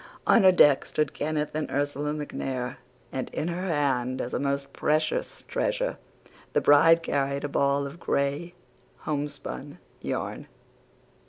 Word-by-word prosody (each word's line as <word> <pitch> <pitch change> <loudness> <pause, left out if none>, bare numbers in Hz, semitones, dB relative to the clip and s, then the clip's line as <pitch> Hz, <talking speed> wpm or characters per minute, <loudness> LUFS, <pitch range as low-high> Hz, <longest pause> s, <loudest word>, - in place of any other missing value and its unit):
On 230 - +6
her 190 -1 +8
deck 145 -6 +6
stood 150 -2 -1
Kenneth 150 0 -2
and 155 0 -2
Ursula 145 +1 -1
MacNair, 135 -4 -4 0.3
and 130 - -3
in 160 - -3
her 180 +2 -3
hand, 135 -5 0
as 120 - -4
a - - 0
most 140 0 -2
precious 155 +1 0
treasure, - - -1 0.5
the - - +4
bride 165 +3 +6
carried 140 -2 -1
a - - 0
ball 140 0 +1
of 140 +5 -8
gray 145 +4 -1 0.5
homespun 145 -1 -4 0.2
yarn." - - -4
145 Hz, 140 wpm, -27 LUFS, 140-155 Hz, 0.5 s, her